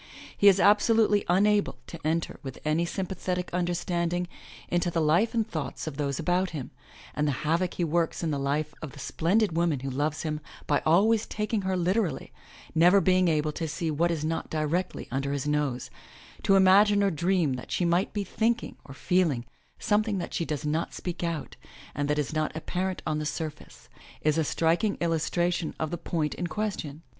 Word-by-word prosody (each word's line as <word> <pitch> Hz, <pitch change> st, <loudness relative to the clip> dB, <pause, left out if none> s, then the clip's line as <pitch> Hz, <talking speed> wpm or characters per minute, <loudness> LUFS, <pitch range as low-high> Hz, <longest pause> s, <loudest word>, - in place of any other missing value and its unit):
He 205 Hz, -, +4 dB
is 195 Hz, -1 st, +7 dB
absolutely 210 Hz, 0 st, +4 dB
unable 205 Hz, +3 st, +3 dB
to 170 Hz, -, -9 dB
enter 160 Hz, +2 st, -1 dB
with 135 Hz, -3 st, -7 dB
any 155 Hz, +3 st, +2 dB
sympathetic 180 Hz, -1 st, -3 dB
understand 175 Hz, -1 st, -1 dB
ing 175 Hz, 0 st, -1 dB, 0.4 s
into 175 Hz, 0 st, 0 dB
the 170 Hz, -, -1 dB
life 170 Hz, +10 st, +2 dB
and 225 Hz, -1 st, +1 dB
thoughts 155 Hz, -7 st, -4 dB
of 155 Hz, -3 st, -5 dB
those 140 Hz, -2 st, -1 dB
about 180 Hz, +3 st, +1 dB
him, 150 Hz, -6 st, -6 dB, 0.4 s
and 150 Hz, 0 st, 0 dB
the -, -, +2 dB
havoc 170 Hz, +3 st, +1 dB
he 175 Hz, -, -1 dB
works 165 Hz, +1 st, 0 dB
in 160 Hz, -, 0 dB
the 140 Hz, -, -1 dB
life 145 Hz, +2 st, -1 dB
of 155 Hz, -, -7 dB
the 145 Hz, -, -11 dB
splendid 175 Hz, +6 st, +1 dB
woman 165 Hz, -5 st, +1 dB
who 135 Hz, 0 st, -3 dB
loves 145 Hz, +3 st, -1 dB
him 155 Hz, -2 st, -2 dB, 0.3 s
by 145 Hz, -, +1 dB
always 210 Hz, +7 st, +4 dB
taking 210 Hz, 0 st, -1 dB
her 190 Hz, -1 st, -1 dB
literally, 180 Hz, -3 st, 0 dB, 0.4 s
never 175 Hz, +5 st, +6 dB
being 185 Hz, -1 st, +3 dB
able 155 Hz, -2 st, +1 dB
to 165 Hz, +1 st, -4 dB
see 160 Hz, +1 st, -2 dB
what 165 Hz, +3 st, +1 dB
is 160 Hz, -3 st, -1 dB
not 165 Hz, +1 st, -2 dB
directly 160 Hz, +4 st, -2 dB
under 140 Hz, +2 st, -1 dB
his 140 Hz, 0 st, -2 dB
nose, 150 Hz, -4 st, -1 dB, 0.5 s
to 195 Hz, -, +4 dB
imagine 200 Hz, +2 st, +6 dB
or 200 Hz, -, +3 dB
dream 170 Hz, -3 st, +1 dB
that 125 Hz, 0 st, -7 dB
she 180 Hz, -, 0 dB
might 175 Hz, +4 st, +2 dB
be 205 Hz, -, -2 dB
thinking 230 Hz, +4 st, -1 dB
or 135 Hz, -, -11 dB
feeling 160 Hz, -8 st, +1 dB, 0.3 s
something 210 Hz, -1 st, +1 dB
that 175 Hz, -, -5 dB
she 170 Hz, -, -1 dB
does 150 Hz, -1 st, -3 dB
not 155 Hz, +3 st, -1 dB
speak 175 Hz, -1 st, -5 dB
out, 165 Hz, -3 st, -3 dB, 0.4 s
and 145 Hz, +1 st, -2 dB
that 150 Hz, -, +1 dB
is 150 Hz, 0 st, -1 dB
not 155 Hz, -1 st, 0 dB
apparent 185 Hz, +3 st, -3 dB
on 155 Hz, -1 st, -1 dB
the 150 Hz, -, -3 dB
surface, 155 Hz, 0 st, -6 dB, 0.4 s
is 155 Hz, +1 st, +2 dB
a -, -, +3 dB
striking 170 Hz, +7 st, +1 dB
illustration 170 Hz, 0 st, 0 dB
of 155 Hz, -1 st, -2 dB
the -, -, -1 dB
point 160 Hz, -2 st, -2 dB
in 175 Hz, -, -3 dB
question. 165 Hz, -5 st, -4 dB
170 Hz, 190 wpm, -27 LUFS, 150-185 Hz, 0.5 s, is